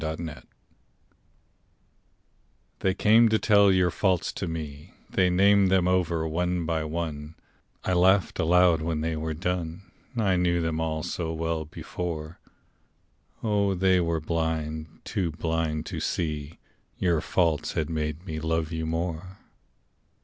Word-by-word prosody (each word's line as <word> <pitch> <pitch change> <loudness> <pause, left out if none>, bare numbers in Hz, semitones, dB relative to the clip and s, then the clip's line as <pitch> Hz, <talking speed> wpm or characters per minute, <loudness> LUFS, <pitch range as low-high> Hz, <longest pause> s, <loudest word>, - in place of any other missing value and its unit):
Faults 80 0 -3 2.5
They 95 -1 +1
came 110 +3 +5
to 110 - +3
tell 100 -2 +5
your 90 -2 +3
faults 95 -1 0
to - - -4
me, 80 0 -7 0.2
They 90 -1 +3
named 100 +2 +4
them 95 -1 +3
over 85 -3 +1
one 90 +1 -1
by 80 -1 -1
one; 75 -1 -4 0.5
I 95 - 0
laughed 95 +2 +3
aloud 85 0 +4
when 80 -1 -1
they 80 0 -1
were 80 0 -3
done, 90 +1 -4 0.3
I 95 -5 +2
knew 85 -1 +2
them 80 -1 -1
all 80 -1 -2
so 80 -2 -3
well 80 0 -2
before, 80 0 -6 1.0
Oh, 100 -3 +1
they 95 0 +3
were 85 -2 0
blind, 80 -1 -3
too 90 -4 -1
blind 80 -1 -1
to - - -5
see 75 -2 -3 0.4
Your 85 -4 +1
faults 80 -4 0
had 80 -3 -1
made 75 +1 -3
me 80 -3 -4
love 80 0 -1
you 80 -1 -3
more. 85 +3 -3
85 Hz, 135 wpm, -26 LUFS, 80-90 Hz, 2.5 s, came